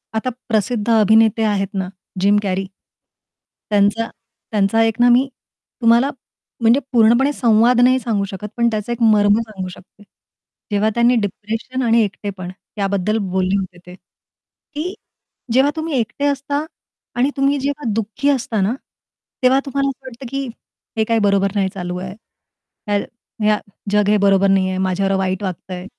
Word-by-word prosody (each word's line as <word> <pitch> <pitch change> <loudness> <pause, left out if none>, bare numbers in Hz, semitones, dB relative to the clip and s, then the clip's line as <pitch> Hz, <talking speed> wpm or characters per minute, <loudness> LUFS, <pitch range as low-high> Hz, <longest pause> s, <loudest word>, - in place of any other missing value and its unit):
आता 220 +3 0 0.2
प्रसिद्ध 220 0 0
अभिनेते 220 0 +4
आहेत 205 -2 +1
ना 190 -1 -2 0.3
जिम 200 +2 +4
कॅरी. 195 -1 -1 1.0
त्यांचा 205 +2 +2 0.4
त्यांचा 210 +1 +2
एक 225 -1 +1
ना 245 0 +5
मी 250 +3 +4 0.5
तुम्हाला 235 +3 +4 0.5
म्हणजे 230 +4 +5
पूर्णपणे 240 +4 +4
संवाद 235 0 +3
नाही 255 +1 +4
सांगू 220 -4 -1
शकत, 195 +2 -6
पण 235 0 +3
त्याचा 215 +1 -3
एक 235 0 -4
मर्म 210 -1 +4
सांगू 210 -5 -6
शकते. 185 +3 -14 0.7
जेव्हा 210 +1 +2
त्यांनी 240 +1 +4
डिप्रेशन 220 +6 -4
आणि 230 -1 +4
एकटेपण 195 -3 -5 0.3
याबद्दल 200 +1 0
बोलले 185 +1 +1
होते 185 -2 -5
ते, 180 - -11
की 305 - -10 0.6
जेव्हा 270 +3 +4
तुम्ही 320 0 -3
एकटे 240 +5 -2
असता 285 +1 -1 0.5
आणि 250 +3 +2
तुम्ही 275 +1 +2
जेव्हा 280 -3 -2
दुःखी 225 +6 -1
असता 235 -6 0
ना 200 +5 +1 0.7
तेव्हा 260 +2 +5
तुम्हाला 275 0 0
असं 270 0 -9
वाटतं 255 +1 -10
की, 275 +1 -3 0.5
हे 220 - +3
काही 225 +1 +1
बरोबर 200 -1 +2
नाही 195 -2 +1
चालू 180 -2 -4
आहे. 185 +1 -6 0.8
या 205 - +3 0.5
या 210 -1 +3 0.3
जग 210 0 +3
हे 210 - +4
बरोबर 195 -1 +3
नाही 190 -1 +3
आहे. 185 - -2
माझ्यावर 190 +1 0
वाईट 190 +1 -1
वागतंय. 185 -1 -5
220 Hz, 150 wpm, -19 LUFS, 195-245 Hz, 1.0 s, ना